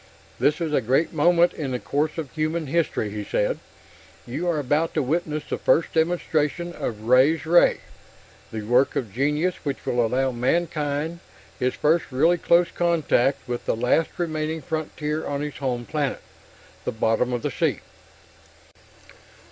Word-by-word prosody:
"This 150 +1 +2
is 160 -3 -2
a 135 - +3
great 130 +8 +1
moment 170 +3 +4
in 145 -4 -4
the 125 - -1
course 150 +5 -1
of 155 -5 -4
human 155 +1 -1
history," 145 -8 0
he 105 0 -4
said. 105 - -1 0.7
"You 145 +9 -3
are 165 - +1
about 150 +3 0
to 155 - +2
witness 155 +1 -1
the - - -3
first 165 - +2
demonstration 165 0 0
of 110 -9 -4
Ray's 135 +7 +4
Ray, 175 +2 +4 0.7
the 110 -1 -5
work 125 +5 +2
of 110 -7 -3
genius 150 +7 0
which 140 -3 -4
will 120 -1 +1
allow 130 +3 +1
mankind 150 +4 -1 0.4
his 125 0 0
first 160 +2 +2
really 165 +7 +3
close 170 +1 +3
contact 150 -7 +1
with 120 -1 -4
the - - +2
last 125 +8 +2
remaining 160 -2 -2
frontier 155 -1 -3
on 140 0 -2
his 150 -1 -5
home 125 -3 -2
planet 145 -1 -2 0.6
the - - -2
bottom 115 +3 +1
of 120 -2 -2
the - - -1
sea!" - - 0
150 Hz, 155 wpm, -24 LUFS, 125-165 Hz, 0.7 s, moment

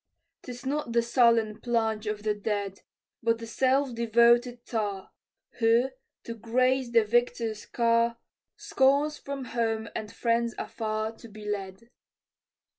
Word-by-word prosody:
'Tis 245 0 -9
not 280 -3 -2
the 235 - +4
sullen 230 -3 +3
plunge 225 -3 0
of 210 0 -3
the 215 -1 +1
dead, 205 -2 -3 0.4
But 230 0 +2
the 230 - -8
self 260 +3 +1
devoted 235 +1 +3
tar, 205 -4 -3 0.5
Who, 235 +3 +3 0.3
to 230 - -6
grace 255 +3 +1
the 230 -1 +4
victor's 230 -1 0
car, 230 0 +2 0.4
Scorns 285 +3 +2
from 275 -2 -6
home 225 -2 -2
and 215 -1 -5
friends 235 0 0
afar 215 -1 -3
To 235 - -12
be 215 -1 -11
led. 205 +3 -5
230 Hz, 130 wpm, -28 LUFS, 220-245 Hz, 0.5 s, the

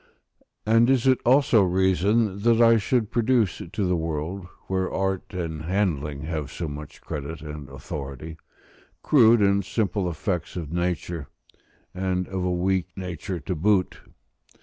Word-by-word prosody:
And 115 +2 +4
is 135 -2 +3
it 130 -2 +4
also 130 -3 +5
reason 95 +3 +2
that 115 +1 +3
I 115 -1 +6
should 110 0 0
produce 120 -3 +1
to 105 -3 -1
the 90 - +2
world, 80 +3 -3 0.2
where 95 0 -1
art 95 -1 -1
and 80 -3 -4
handling 80 -7 -1
have 75 -3 -4
so 85 - -4
much 75 0 -8
credit 75 +1 -6
and 75 -2 -8
authority, 70 +1 -7 0.7
crude 115 -5 +5
and 100 0 +3
simple 105 -2 -1
effects 85 +2 -3
of 85 -3 -5
nature, 85 -3 -2 0.7
and 90 -1 -1
of 95 -1 -3
a 90 - 0
weak 90 +1 0
nature 90 -1 -5
to 90 - -3
boot? 95 +3 +1
95 Hz, 145 wpm, -25 LUFS, 80-105 Hz, 0.7 s, I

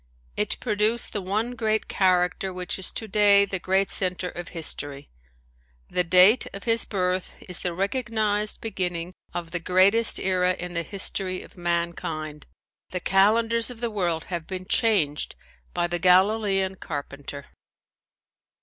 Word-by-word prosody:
It 210 0 0
produced 220 0 0
the 205 - -2
one 210 +6 -2
great 220 -2 -1
character 185 0 +1
which 180 +1 -4
is 190 - -2
today 205 -2 +4
the 190 -1 -3
great 190 +2 +1
center 180 -1 -1
of 175 0 -8
history. 145 - -3 0.8
The 180 - +1
date 185 +7 +6
of 200 - -8
his 230 -1 +2
birth 185 -2 -2
is 180 -2 -1
the 175 -2 -3
recognized 210 0 0
beginning 180 -5 -3 0.2
of 170 -1 -6
the 175 - -1
greatest 190 +6 +5
era 185 -1 +1
in 180 0 -6
the 170 - -1
history 190 0 -2
of - - -16
mankind. 170 -3 -3 0.4
The 180 - -3
calendars 225 +6 +2
of 245 -2 -9
the 235 -1 -2
world 175 -6 -1
have 170 -2 -4
been 185 -1 -6
changed 185 -11 0 0.4
by 175 0 -1
the 175 0 -2
Galilean 190 +1 +3
carpenter. 140 -2 -7
185 Hz, 140 wpm, -25 LUFS, 175-210 Hz, 0.8 s, date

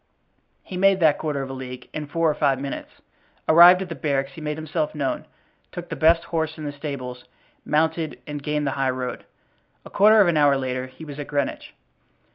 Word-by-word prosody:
He 185 - -7
made 195 0 +4
that 155 -4 +3
quarter 145 -3 -2
of 135 - -7
a - - -6
league 125 -1 -8
in 155 -1 -5
four 165 +3 0
or 155 - +3
five 140 -3 +1
minutes. 140 0 -7 0.4
Arrived 175 +3 +8
at 185 - -10
the - - -4
barracks 140 -2 -1
he 160 - -11
made 150 0 -3
himself 155 0 -3
known, 140 -3 -2 0.4
took 175 -1 -8
the 165 - -4
best 165 +3 +4
horse 160 -1 -3
in 155 - -7
the 145 - -3
stables, 140 -4 -7 0.4
mounted 160 +1 0
and 145 -1 -6
gained 150 +1 -1
the 135 - 0
high 135 -1 0
road. 130 -1 -4 0.6
A - - -12
quarter 215 +2 +6
of 200 - +6
an 170 -2 +2
hour 145 -2 +4
later 130 -1 -3
he 145 +5 -12
was 145 -1 -9
at 145 - -5
Greenwich. 140 -2 -3
150 Hz, 210 wpm, -23 LUFS, 135-160 Hz, 0.6 s, Arrived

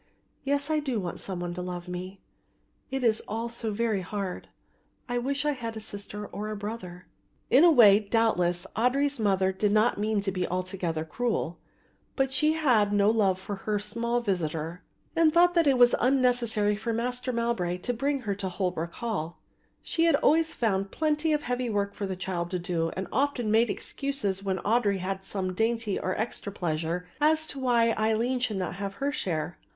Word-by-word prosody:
Yes, 285 +2 0
I 310 - +2
do 265 -6 -2
want 180 -3 -5
some 185 -2 -4
one 175 0 -3
to 180 - -5
love 180 0 -5
me, 180 +2 -6 0.7
it 265 -1 -3
is 225 -2 +4
all 225 +2 -3
so 230 -1 -3
very 215 -2 0
hard; 190 0 -5 0.6
I 245 0 -1
wish 275 +3 -2
I 295 - +3
had 230 -5 -5
a - - -4
sister 210 -1 -6
or 210 +1 -5
a 215 - -3
brother." 200 -4 -7 0.5
In 265 +6 +7
a 350 - +8
way, 215 -9 +7
doubtless, 200 -5 +1
Audry's 275 +4 +1
mother 190 -3 +2
did 200 +2 0
not 215 +1 +3
mean 215 0 +1
to 195 -1 -2
be 180 -1 -2
altogether 180 -3 -2
cruel; 195 -2 -2 0.6
but 270 -1 0
she 305 +4 +3
had 245 -10 +3
no 205 +1 +4
love 200 -5 +2
for 200 +1 -5
her 210 +2 -1
small 235 +3 -1
visitor 170 -4 -2 0.3
and 330 -1 +5
thought 350 +2 +5
that 335 -3 +3
it 270 -2 +4
was 245 0 +6
unnecessary 245 -5 +2
for 225 +2 -3
Master 250 +2 -2
Mowbray 230 -7 -1
to 245 +7 -2
bring 275 +3 -1
her 210 -4 -2
to 195 -1 -4
Holwick 180 -3 -2
Hall. 190 -8 -4
So - - -41 0.3
she 330 0 +2
always 320 +2 +3
found 195 -4 0
plenty 310 +3 0
of 300 -1 +1
heavy 245 0 -2
work 200 -2 -1
for 200 - -4
the 190 - -3
child 180 -2 -3
to 185 - -1
do 170 -2 -1
and 190 -1 -3
often 265 -5 0
made 225 +1 +4
excuses 210 -10 -2
when 190 -1 -1
Audry 210 -3 +2
had 190 +1 -4
some 190 -2 -3
dainty 225 0 0
or 185 - -2
extra 220 -2 -3
pleasure 170 -1 -2
as 315 +1 +4
to 280 - -4
why 235 -3 +3
Aline 225 +4 +1
should 225 -5 -1
not 185 -2 -2
have 195 0 -4
her 280 +4 -1
share. 170 - -3
215 Hz, 190 wpm, -28 LUFS, 190-250 Hz, 0.7 s, a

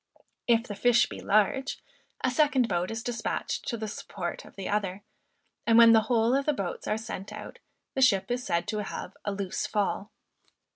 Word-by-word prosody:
If 230 -1 +4
the 220 - -6
fish 235 +3 +4
be - - -8
large, 215 +6 +1 0.4
a 255 - +2
second 270 -3 +3
boat 175 -3 -1
is 225 0 -4
despatched 245 -1 -3
to 235 - -1
the 220 0 -4
support 185 -3 -5
of - - -16
the 195 - -5
other; 200 -1 -1 0.6
and 230 -1 +6
when 230 -1 +9
the 225 - +7
whole 230 0 +3
of 275 +2 +1
the 300 - +4
boats 195 -9 -4
are 215 - +1
sent 210 -3 -6
out, - - -9 0.3
the 265 - -1
ship 215 -5 +4
is 245 +1 -1
said 170 -3 -1
to 215 -1 -1
have - - -6
"a 205 - 0
loose 195 -2 -3
fall." 205 0 -1
220 Hz, 195 wpm, -28 LUFS, 200-245 Hz, 0.6 s, when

